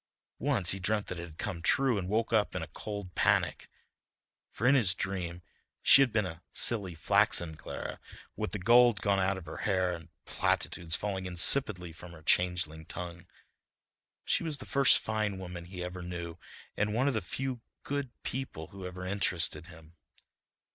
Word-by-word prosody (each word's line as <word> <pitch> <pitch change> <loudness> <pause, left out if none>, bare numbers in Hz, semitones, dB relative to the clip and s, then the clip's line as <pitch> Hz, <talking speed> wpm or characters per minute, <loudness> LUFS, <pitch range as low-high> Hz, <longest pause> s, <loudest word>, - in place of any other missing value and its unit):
Once 90 -3 +3
he 95 - -2
dreamt 105 +3 0
that 90 - -6
it 85 - -6
had 80 -1 -15
come 100 -7 -4
true 125 +4 +2
and 90 -1 -5
woke 115 +2 0
up 105 -2 +1
in - - -2
a - - -7
cold 100 -4 -7
panic, - - +1 0.8
for 115 - -5
in 130 - +6
his 105 -10 +4
dream 90 -2 -4 0.4
she 140 - +8
had 135 -3 +3
been 105 -2 +1
a 85 -2 -8
silly, 100 -7 +3
flaxen 80 +1 +1
Clara, - - -7 0.4
with - - -4
the - - -3
gold 120 +2 +5
gone 100 -1 +1
out 95 +1 0
of 95 - -9
her 80 - -8
hair 95 -3 0
and 85 -1 -9 0.2
platitudes 80 -2 -1
falling 95 -2 -3
insipidly 90 -1 +6
from 85 +1 -12
her 80 -2 -14
changeling 90 -2 0
tongue. 85 0 -8 1.0
But - - -3
she - - +2
was 155 -3 -2
the 130 - -10
first 140 -3 +5
fine 110 -3 -2
woman 90 -2 -8
he 90 0 -7
ever 90 0 -6
knew 85 -1 -6 0.4
and 105 +1 -1
one 130 +4 +1
of 140 - +1
the 110 - -1
few 130 +6 -4 0.2
good 140 -2 -3
people 120 -12 -5
who 95 -2 -8
ever 90 0 -8
interested 90 -3 0
him. 80 -2 -15
95 Hz, 180 wpm, -30 LUFS, 85-110 Hz, 1.0 s, she